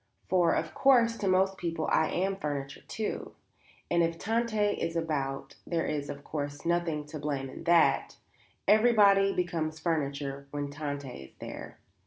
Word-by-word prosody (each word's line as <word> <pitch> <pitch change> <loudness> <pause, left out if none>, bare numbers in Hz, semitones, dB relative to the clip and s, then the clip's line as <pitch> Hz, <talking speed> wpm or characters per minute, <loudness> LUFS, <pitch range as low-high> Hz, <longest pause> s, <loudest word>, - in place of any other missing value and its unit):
"For, 175 -2 +4
of - - -2
course, 240 -4 +4
to 200 - -1
most 190 +1 +2
people 165 -2 -2
I 160 - +4
am 190 +2 0
furniture, 140 -6 -4
too; 220 -1 -4 0.6
and 170 - +4
if 165 0 +1
Tante 220 0 +1
is 165 - -3
about, 145 -5 -2
there 165 -1 0
is, 145 -2 -2
of 140 0 -7
course, 145 -2 -5
nothing 170 -3 0
to 150 +1 -7
blame 140 -2 -3
in 165 - -10
that; 170 -1 +3 0.5
everybody 205 -2 +5
becomes 165 -4 -2
furniture 140 -4 -2
when 145 0 -4
Tante 145 -1 -4 0.2
is - - -19
there." - - -8
165 Hz, 155 wpm, -29 LUFS, 145-195 Hz, 0.6 s, everybody